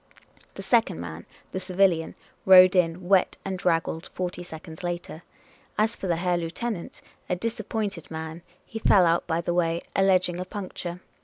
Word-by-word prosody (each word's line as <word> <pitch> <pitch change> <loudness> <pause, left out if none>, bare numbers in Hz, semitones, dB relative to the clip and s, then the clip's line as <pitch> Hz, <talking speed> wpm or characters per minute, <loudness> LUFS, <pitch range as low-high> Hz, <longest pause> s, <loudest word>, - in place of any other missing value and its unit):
The - - -7
second - - +2
man, 85 -1 -7 0.2
the 185 - -3
civilian, 185 -3 +1 0.3
rode 185 0 +8
in, 175 0 +1
wet 190 -1 +3
and 190 -1 -2
draggled, 165 -2 0
forty 180 -1 -4
seconds 160 -2 -10
later. 175 -2 -4 0.6
As 220 +2 +2
for 190 - -5
the 170 - +2
Herr 175 +1 0
Lieutenant, 175 +3 -5 0.3
a - - +1
disap 220 +2 -4
pointed 200 -8 -3
man, 160 +1 -6 0.2
he 225 - -7
fell 195 -4 +5
out 170 0 +2
by 165 0 0
the 170 +1 -1
way, 170 -1 +1 0.2
alleging 185 -2 +3
a 185 - -3
puncture. 180 -2 -6
180 Hz, 165 wpm, -26 LUFS, 165-190 Hz, 0.6 s, rode